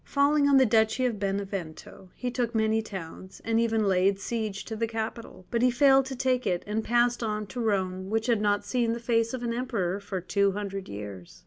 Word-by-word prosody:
Falling 285 0 +3
on 275 - +6
the 265 - +6
Duchy 220 +2 +2
of 230 -5 -1
Benevento, 195 -3 -5
he 250 -1 -3
took 240 -2 -2
many 220 0 +2
towns, 190 -3 -9
and 225 0 +2
even 225 -1 +1
laid 190 +1 +3
siege 215 -3 -3
to 220 - -5
the 230 +1 -1
capital. 225 -3 -6
But 235 -1 +1
he 250 - +5
failed 270 +1 +5
to 265 - -5
take 255 0 0
it, 180 -2 0
and 215 +2 -2
passed 240 +1 +2
on 215 -2 -2
to 225 +5 -7
Rome, 190 -3 -1
which 220 +1 0
had 235 -4 +2
not 205 -1 +1
seen 235 -3 0
the 235 - -4
face 230 -1 +1
of 245 - -6
an 235 -1 -1
emperor 205 -7 -2
for 200 -1 -4
two 200 +2 +1
hundred 195 -1 -5
years. 100 -3 -8
220 Hz, 215 wpm, -27 LUFS, 195-240 Hz, -, on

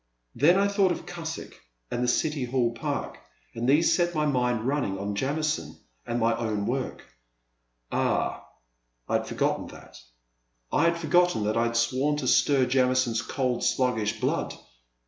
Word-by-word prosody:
Then 170 +6 +4
I 200 +1 +3
thought 200 -2 +2
of 175 - -4
Cusick 165 -2 -7 0.3
and 120 - -1
the - - +1
City 145 +2 0
Hall 120 -1 +1
Park 115 - -4 0.3
and 120 +2 -1
these 155 +4 +4
set 175 -1 +1
my 150 0 +1
mind 125 -5 +1
running 130 -7 -1
on 100 +1 -3
Jamison 150 +7 -2 0.3
and 120 - -1
my 115 0 +2
own 110 -3 -2
work, 130 +3 -3 0.5
— - - -47
^ah! - - 0 0.7
I - - -3
had - - -6
forgotten - - -1
that, - - -13 0.4
— - - -47
I 155 - +3
had 170 0 +2
forgotten 170 -6 +2
that 105 +1 0
I 115 0 +2
had 115 0 -1
sworn 130 +5 +1
to 135 -4 -3
stir 135 +1 +4
Jamison's 125 -2 +2
cold, 125 0 -2
sluggish 110 -4 0
blood - - -1
125 Hz, 165 wpm, -27 LUFS, 115-150 Hz, 0.7 s, Then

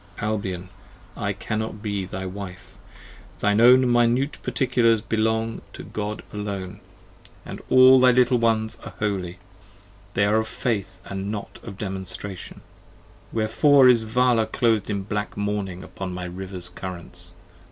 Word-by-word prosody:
Albion, 95 -4 -3 0.5
I - - -2
cannot 110 -1 -4
be 100 -3 -2
thy 95 +1 -6
Wife, 95 -1 -8 0.6
thine 105 +1 +2
own 125 +2 +8
Minute 120 +3 +2
Particulars 115 -4 +2
45 - - -23
Belong 110 +1 0
to - - -8
God 105 0 -5
alone, 100 -2 -5 0.7
and - - -7
all 130 0 +8
thy 130 0 +6
little 125 0 +4
ones 110 -1 +1
are 105 - -9
holy, 95 -4 -2 0.8
They 100 - +3
are 105 +2 +3
of 110 0 0
Faith 100 -7 -3
& - - -11
not 100 +2 -5
of 100 -4 -9
Demonstration: 95 -1 -6 0.7
wherefore 130 +5 +5
is 120 -2 +6
Vala 115 0 +2
Cloth'd 110 -4 +1
in 100 -2 -2
black 105 +1 -4
mourning 100 -3 -3
upon 95 -1 -6
my 90 0 -5
river's 90 0 -6
currents? 90 -1 -6
105 Hz, 140 wpm, -24 LUFS, 95-115 Hz, 0.8 s, own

